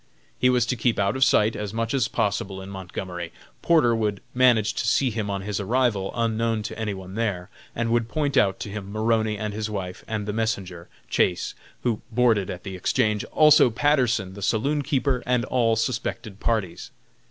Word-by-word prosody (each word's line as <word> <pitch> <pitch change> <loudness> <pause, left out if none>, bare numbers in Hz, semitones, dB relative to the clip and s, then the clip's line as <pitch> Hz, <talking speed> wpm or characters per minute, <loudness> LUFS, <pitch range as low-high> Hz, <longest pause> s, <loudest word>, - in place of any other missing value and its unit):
He 125 - +4
was 125 -2 +3
to 125 - -1
keep 120 0 +1
out 100 +2 +1
of 130 - +3
sight 110 -5 +3
as 105 0 -5
much 115 0 -1
as 130 -5 +2
possible 100 -4 -2
in 95 +1 -8
Montgomery. 90 -2 -6 0.3
Porter 145 -9 +4
would 105 -3 -1
manage 120 -4 +4
to - - -2
see 130 +2 +2
him 105 -2 -3
on 100 -1 -2
his 105 0 -3
arrival, 105 -2 0
unknown 115 -1 0
to 115 - -6
any 105 -3 -2
one 95 0 -9
there, 100 -5 -2 0.2
and 115 0 -1
would 115 -1 +1
point 145 0 -1
out 95 -6 +3
to - - -4
him 100 -1 -6
Maroney 110 0 +1
and 105 0 -4
his 110 +1 -3
wife, 95 -3 -5
and 110 -2 -3
the 105 - -2
messenger, 95 -6 -3 0.2
Chase, 90 -1 0 0.3
who 115 -4 0
boarded 115 -5 +2
at 90 - -6
the 95 -1 -6
Exchange; 105 +3 +1
also 150 -4 +6
Patterson, 120 -7 +1
the 100 - -9
saloon 130 +9 +1
keeper, 135 -2 0
and 125 -1 +2
all 115 -3 +2
suspected 110 -3 -3
parties. 110 -8 -2
110 Hz, 190 wpm, -24 LUFS, 100-120 Hz, 0.3 s, also